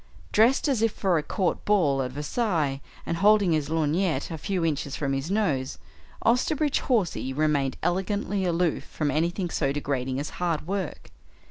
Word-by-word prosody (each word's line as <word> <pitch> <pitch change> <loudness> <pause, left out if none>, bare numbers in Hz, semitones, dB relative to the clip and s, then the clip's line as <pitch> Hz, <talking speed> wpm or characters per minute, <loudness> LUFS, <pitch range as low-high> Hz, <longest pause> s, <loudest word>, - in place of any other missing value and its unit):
Dressed 240 +8 +4
as 265 -6 +1
if 225 -1 +3
for 185 -6 +1
a - - -1
court 185 +4 -1
ball 160 -10 +2
at 130 - -2
Versailles 150 - -1 0.2
and 165 - -2
holding 205 -1 +4
his 155 -2 0
lorgnette 160 0 0
a 165 - -4
few 185 0 -1
inches 145 -3 -1
from 140 -2 -1
his 135 +4 -2
nose, 155 -11 0 0.5
Osterbridge 285 +5 +2
Hawsey 195 - +1
remained 145 -2 +1
elegantly 195 +2 0
aloof 175 -2 0
from 150 -2 -2
anything 170 +4 -1
so 135 - 0
degrading 135 -2 -2
as 145 - -4
hard 165 -4 0
work. 190 -2 -4
165 Hz, 160 wpm, -26 LUFS, 145-200 Hz, 0.5 s, Dressed